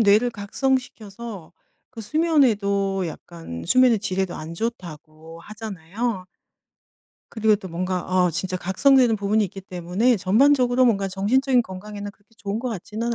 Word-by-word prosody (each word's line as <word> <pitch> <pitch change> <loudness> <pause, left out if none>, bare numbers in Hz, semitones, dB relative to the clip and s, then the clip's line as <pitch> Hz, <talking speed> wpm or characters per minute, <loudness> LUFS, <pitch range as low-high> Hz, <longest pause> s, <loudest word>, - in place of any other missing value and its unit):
뇌를 220 +3 +4
각성시켜서 220 - -4 0.4
그 235 - -9
수면에도 210 - +1
약간 165 - -8
수면의 250 +2 +5
질에도 190 -2 -2
안 160 +2 -7
좋다고 165 -6 -7
하잖아요. 205 0 -5 1.1
그리고 220 -1 +2
또 195 -2 -6
뭔가 180 +2 -2
어 185 -1 +1
진짜 185 +3 -3
각성되는 235 +7 +3
부분이 210 +1 +1
있기 195 +1 -7
때문에 185 +6 0
전반적으로 250 +5 +3
뭔가 200 -5 +2
정신적인 245 +7 +2
건강에는 205 +1 -8
그렇게 205 +2 -30
좋은 205 +1 -4
것 250 +1 -3
같지는 225 +3 -4
205 Hz, 335 characters per minute, -23 LUFS, 185-235 Hz, 1.1 s, 수면의